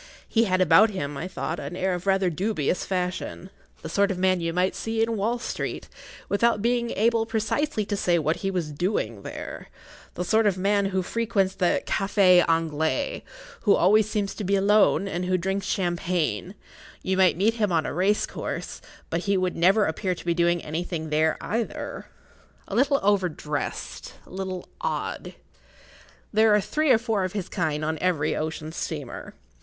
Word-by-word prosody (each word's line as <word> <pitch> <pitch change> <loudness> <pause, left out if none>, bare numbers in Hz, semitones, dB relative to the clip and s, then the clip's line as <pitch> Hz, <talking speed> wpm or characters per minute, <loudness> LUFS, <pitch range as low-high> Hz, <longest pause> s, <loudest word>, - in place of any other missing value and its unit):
He 230 0 +2
had 185 -2 +1
about 180 +5 +6
him, 145 -8 -4
I 160 +6 -4
thought, 170 -2 -4
an 145 +4 -6
air 185 0 0
of 180 +2 -5
rather 190 -2 +2
dubious 180 -2 -1
fashion; 185 0 -3 0.3
the - - -4
sort 200 +4 +2
of 190 - -2
man 185 -1 +2
you 165 0 -1
might 180 +2 +1
see 225 0 -1
in 225 0 -1
Wall 220 +4 0
Street, 235 - -4 0.4
without 230 +2 +2
being 235 +2 +1
able 225 +1 +2
precisely 225 +2 -1
to 205 - -2
say 175 -3 +2
what 155 0 0
he 195 - -2
was 175 -5 -2
doing 145 - -2
there—the 180 - -9
sort 220 +3 +3
of 190 -2 +1
man 200 +1 +2
who 190 -1 0
frequents 200 -2 0
the 185 -2 +1
Café 195 -3 +4
Anglais, 165 - 0 0.4
who 205 - +4
always 210 +4 +4
seems 205 -2 -1
to 215 - -6
be 200 +1 +1
alone 200 0 +4
and 180 -2 -3
who 185 0 +1
drinks 190 +2 -2
champagne; 175 0 -1 0.5
you 190 - 0
might 185 -3 +4
meet 210 +5 +3
him 210 -4 0
on 160 -2 +1
a - - -3
race 195 +6 +2
course, - - -6 0.3
but 170 +2 -1
he 200 -1 +2
would 185 -1 0
never 195 +5 +4
appear 180 +3 -1
to - - -11
be 170 - +2
doing 170 0 +1
anything 160 0 -4
there 155 +1 +2
either. 230 +1 -4 0.6
A - - -7
little 275 +2 +3
over 195 -3 +3
dressed—a 150 -2 -6
little 185 -1 -5
odd. - - -3 1.0
There 215 0 +5
are - - +4
three 305 +9 0
or 250 - +7
four 225 -4 -1
of 185 - -3
his 200 -4 -3
kind 155 -5 -1
on 160 0 -2
every 165 -5 +1
ocean 155 0 -4
steamer. 150 -5 -6
185 Hz, 180 wpm, -25 LUFS, 170-210 Hz, 1.0 s, or